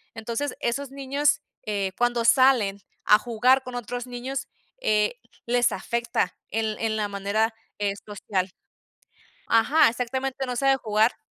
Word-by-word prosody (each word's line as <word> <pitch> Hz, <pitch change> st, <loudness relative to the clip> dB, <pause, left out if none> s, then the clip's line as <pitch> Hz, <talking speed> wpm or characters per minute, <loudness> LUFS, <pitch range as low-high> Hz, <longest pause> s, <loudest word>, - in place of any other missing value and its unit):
Entonces, 235 Hz, +5 st, -3 dB
esos 270 Hz, +3 st, -2 dB
niños, 275 Hz, +1 st, +1 dB, 0.2 s
eh, 200 Hz, -2 st, -1 dB
cuando 240 Hz, -1 st, +1 dB
salen 240 Hz, -6 st, +4 dB, 0.3 s
a 210 Hz, -, +7 dB
jugar 250 Hz, +3 st, +3 dB
con 255 Hz, -1 st, -7 dB
otros 245 Hz, +1 st, -4 dB
niños, 250 Hz, +2 st, -4 dB, 0.3 s
eh, 210 Hz, -, +2 dB, 0.3 s
les 245 Hz, 0 st, +3 dB
afecta 235 Hz, -3 st, -1 dB
en 220 Hz, 0 st, -1 dB
en 220 Hz, -1 st, 0 dB
la 210 Hz, -, 0 dB
manera, 205 Hz, +3 st, 0 dB, 0.3 s
eh, 205 Hz, -1 st, 0 dB
social. 195 Hz, -2 st, -2 dB, 1.0 s
Ajá, 230 Hz, +6 st, +5 dB
exactamente, 260 Hz, +3 st, -2 dB
no 250 Hz, -1 st, -3 dB
sabe 270 Hz, +1 st, +3 dB
jugar. 220 Hz, -1 st, +2 dB
235 Hz, 135 wpm, -25 LUFS, 215-255 Hz, 1.0 s, a